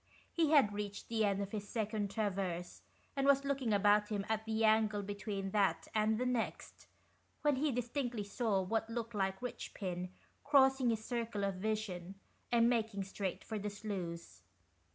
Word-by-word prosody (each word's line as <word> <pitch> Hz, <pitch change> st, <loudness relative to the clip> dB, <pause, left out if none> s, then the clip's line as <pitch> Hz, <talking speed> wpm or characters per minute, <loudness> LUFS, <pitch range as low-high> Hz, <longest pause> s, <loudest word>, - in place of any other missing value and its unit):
He 325 Hz, -3 st, +3 dB
had 275 Hz, -9 st, +5 dB
reached 205 Hz, -1 st, -5 dB
the 225 Hz, -1 st, +1 dB
end 200 Hz, 0 st, +1 dB
of 200 Hz, -, -7 dB
his 205 Hz, -2 st, -5 dB
second 215 Hz, -2 st, -1 dB
traverse, 190 Hz, -4 st, -2 dB
64 -, -, -33 dB
THE -, -, -35 dB
RIOHPINS. -, -, -35 dB
and 275 Hz, 0 st, +2 dB
was 280 Hz, 0 st, +5 dB
looking 270 Hz, -4 st, 0 dB
about 205 Hz, +1 st, +4 dB
him 205 Hz, -2 st, -2 dB
at 220 Hz, 0 st, 0 dB
the 220 Hz, 0 st, +1 dB
angle 215 Hz, -1 st, +3 dB
between 200 Hz, -1 st, -4 dB
that 200 Hz, -2 st, +2 dB
and 215 Hz, 0 st, +2 dB
the 250 Hz, -, 0 dB
next, 250 Hz, -3 st, -3 dB, 0.6 s
when 295 Hz, -3 st, +3 dB
he 295 Hz, +2 st, +1 dB
distinctly 245 Hz, -2 st, -2 dB
saw 200 Hz, -2 st, 0 dB
what 225 Hz, +4 st, -1 dB
looked 230 Hz, 0 st, -4 dB
like 195 Hz, +1 st, -1 dB
Richpin 185 Hz, -6 st, -4 dB, 0.3 s
crossing 270 Hz, -3 st, +5 dB
his 220 Hz, -1 st, -1 dB
circle 230 Hz, -4 st, -2 dB
of 195 Hz, 0 st, +1 dB
vision, 195 Hz, -3 st, -3 dB, 0.4 s
and 235 Hz, -1 st, +5 dB
making 225 Hz, -4 st, 0 dB
straight 195 Hz, -1 st, -4 dB
for 220 Hz, -2 st, -4 dB
the 210 Hz, +1 st, -3 dB
sluice. 175 Hz, -, -5 dB
215 Hz, 175 wpm, -35 LUFS, 200-235 Hz, 0.6 s, had